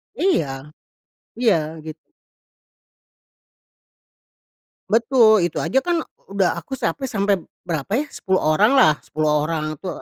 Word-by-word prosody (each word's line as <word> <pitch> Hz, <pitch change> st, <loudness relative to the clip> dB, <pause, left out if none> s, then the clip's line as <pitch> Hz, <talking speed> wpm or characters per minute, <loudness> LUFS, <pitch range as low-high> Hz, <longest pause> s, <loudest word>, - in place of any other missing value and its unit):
Iya. 150 Hz, -, -1 dB, 0.7 s
Ya 165 Hz, -10 st, +1 dB
git 155 Hz, 0 st, -8 dB, 2.9 s
Betul. 225 Hz, -3 st, +4 dB
Itu 175 Hz, -, -3 dB
aja 175 Hz, +11 st, +1 dB
kan 345 Hz, -2 st, +1 dB, 0.3 s
udah 195 Hz, -3 st, 0 dB
aku 170 Hz, +10 st, -8 dB
sampai 265 Hz, +1 st, -2 dB
sampai, 200 Hz, -5 st, +1 dB, 0.3 s
berapa 165 Hz, -1 st, -4 dB
ya, 275 Hz, +7 st, +1 dB
10 190 Hz, -7 st, -1 dB
oranglah 195 Hz, -, +4 dB
10 155 Hz, 0 st, -1 dB, 0.2 s
orang 155 Hz, -1 st, -3 dB
itu 185 Hz, -, -9 dB
190 Hz, 110 wpm, -21 LUFS, 155-235 Hz, 2.9 s, Betul